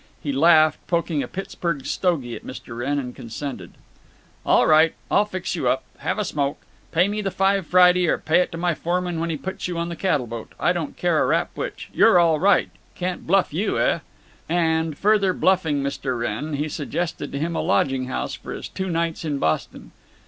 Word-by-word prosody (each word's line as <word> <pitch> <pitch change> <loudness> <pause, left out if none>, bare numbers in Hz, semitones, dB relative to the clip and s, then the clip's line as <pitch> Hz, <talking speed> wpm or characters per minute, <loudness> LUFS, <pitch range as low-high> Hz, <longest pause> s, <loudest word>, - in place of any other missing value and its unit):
He 145 - -3
laughed, 155 +2 +5
poked 170 -1 0
a 145 -5 -1
Pittsburg 170 -5 -4
stogie 150 -10 -1
at - - -10
Mr. 125 -2 -8
Wrenn, 135 +5 -1
and 125 -3 -4
consented: 130 +4 -7 0.7
"All - - +4
right. 155 +1 +5 0.2
I'll 205 - +4
fix 185 -3 -4
you 145 -7 -1
up. 130 +1 +1 0.2
Have - - -2
a 210 - -1
smoke. 145 -4 -1 0.3
Pay 175 +3 +3
me 210 +1 -2
the 195 - -1
five 195 -1 +1
Friday, 180 0 +5
or - - +2
pay 160 - +2
it 180 - 0
to 165 - -6
my 175 0 +1
foreman 175 +1 -2
when 165 +1 -1
he 160 - -2
puts 190 +4 -5
you 175 -1 -4
on 170 0 -2
the 170 - -5
cattle 155 -8 0
boat. 115 -1 -8
I - - +2
don't - - -4
care - - +2
a - - +1
rap - - +1
which. - - -6
You're - - +6
all 165 -3 +4
right. 200 +3 +3 0.2
Can't 180 0 -4
bluff 190 -2 +2
you, 190 +7 0
eh?" - - +2 0.5
And, 160 -2 +1
further 200 -2 +3
bluffing 160 -8 +1
Mr. 135 -2 -2
Wrenn, 120 +7 -3
he 150 +2 -1
suggested 155 0 -4
to - - -4
him 165 +3 -2
a - - 0
lodging 135 -1 +1
house 130 - -3
for - - -7
his - - -7
two 190 0 -4
nights 165 -1 -1
in 150 -3 -2
Boston. 80 -12 -2
165 Hz, 205 wpm, -23 LUFS, 140-180 Hz, 0.7 s, You're